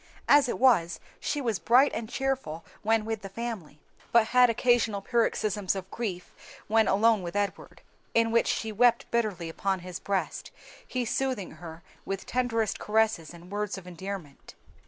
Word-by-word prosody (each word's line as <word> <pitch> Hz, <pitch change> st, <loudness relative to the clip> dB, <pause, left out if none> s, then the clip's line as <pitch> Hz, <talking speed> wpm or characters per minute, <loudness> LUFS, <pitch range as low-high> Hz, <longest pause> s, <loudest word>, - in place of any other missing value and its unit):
As 285 Hz, -2 st, +6 dB
it -, -, -2 dB
was 225 Hz, -10 st, +3 dB, 0.2 s
she 295 Hz, -, -2 dB
was 230 Hz, -7 st, -1 dB
bright 255 Hz, +5 st, +5 dB
and 220 Hz, -1 st, -4 dB
cheerful 265 Hz, -, -2 dB, 0.2 s
when 220 Hz, 0 st, +2 dB
with 225 Hz, -1 st, -3 dB
the 195 Hz, -, -7 dB
family, 195 Hz, -8 st, -6 dB, 0.3 s
but 230 Hz, -2 st, +4 dB
had 250 Hz, -1 st, +6 dB
occasional 230 Hz, -3 st, +2 dB
paroxysms 210 Hz, -3 st, 0 dB
of 190 Hz, 0 st, -7 dB
grief 195 Hz, -7 st, -5 dB, 0.3 s
when 220 Hz, 0 st, +3 dB
alone 220 Hz, +1 st, +4 dB
with 175 Hz, +1 st, -6 dB
Edward, 205 Hz, 0 st, -3 dB, 0.3 s
in 230 Hz, 0 st, +3 dB
which 230 Hz, -, +3 dB
she 220 Hz, -, -1 dB
wept 235 Hz, +2 st, +3 dB
bitterly 210 Hz, -8 st, -1 dB
upon 190 Hz, +3 st, -2 dB
his 180 Hz, -1 st, -7 dB
breast, 195 Hz, -1 st, -2 dB, 0.4 s
he 250 Hz, -1 st, -2 dB
soothing 250 Hz, -5 st, -2 dB
her 165 Hz, +1 st, -10 dB, 0.2 s
with 195 Hz, -1 st, -4 dB
tenderest 230 Hz, -4 st, -1 dB
caresses 215 Hz, -6 st, +1 dB
and 175 Hz, +2 st, -13 dB
words 210 Hz, 0 st, -2 dB
of 190 Hz, -, -10 dB
endearment. 180 Hz, -4 st, -8 dB
215 Hz, 160 wpm, -28 LUFS, 190-235 Hz, 0.4 s, As